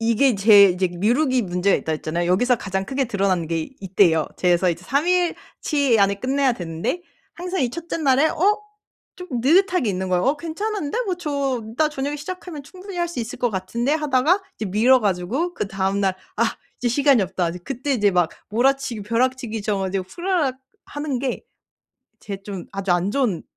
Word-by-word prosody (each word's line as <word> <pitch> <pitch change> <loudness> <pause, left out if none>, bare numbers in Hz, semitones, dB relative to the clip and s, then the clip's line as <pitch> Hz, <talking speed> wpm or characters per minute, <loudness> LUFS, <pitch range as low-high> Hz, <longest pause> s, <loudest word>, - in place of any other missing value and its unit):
이게 230 +3 +3
제 205 0 +7
이제 185 -1 +2
미루기 245 - +1
문제가 180 0 +1
있다고 160 - -2
했잖아요. 165 +3 -2
여기서 245 +7 +3
가장 190 -2 -3
크게 270 +6 -1
드러나는 195 -7 0
게 165 -1 -3
이 195 - -7
때예요. 160 -6 +4
제 180 - 0
그래서 175 +1 +3
이제 170 0 -2
3 280 - 0
일 360 -1 +2 0.2
치 280 -6 +2
안에 200 0 +3
끝내야 265 +4 +1
되는데 170 - -3 0.3
항상 360 +2 -3
이 245 - 0
1 335 +5 -8
째 - - -2
날에 280 -1 +3
어 410 +7 +2 0.6
좀 360 0 -9
느긋하게 315 - +3
있는 190 0 -3
거예요. 180 -1 +1
'어 275 +3 +2
괜찮은데? 335 +3 -3
뭐 380 -4 -1
저 280 -7 -2 0.2
이따 310 -1 +4
저녁에 290 0 -3
시작하면 320 -1 -7
충분히 370 +4 -10
할 345 0 0
수 335 -7 -5
있을 230 +1 -6
것 245 - +1
같은데?' 230 +6 -2
하다가 305 +5 +2
이제 - - -4
미뤄 235 +7 +5
가지고 215 - -1
그다음 195 - -1
날 190 -2 +1 0.2
'아 230 - +2 0.4
이제 245 - 0
시간이 270 -1 +4
없다.' 180 -2 -1
이제 180 +1 -8
그때 275 +4 -3
이제 210 -6 +3
막 175 -3 +2 0.2
몰아치기 245 0 +1
벼락치기 230 0 -1
쳐 210 -1 0
가지고 190 0 -2
후다닥 340 - -1 0.3
하는 290 -4 -3
게 260 -2 -3 0.8
제 200 - -5
좀 195 -3 -7
아주 195 -2 0
안 175 +3 +1
좋은 230 -8 0
245 Hz, 375 characters per minute, -22 LUFS, 195-290 Hz, 0.8 s, 제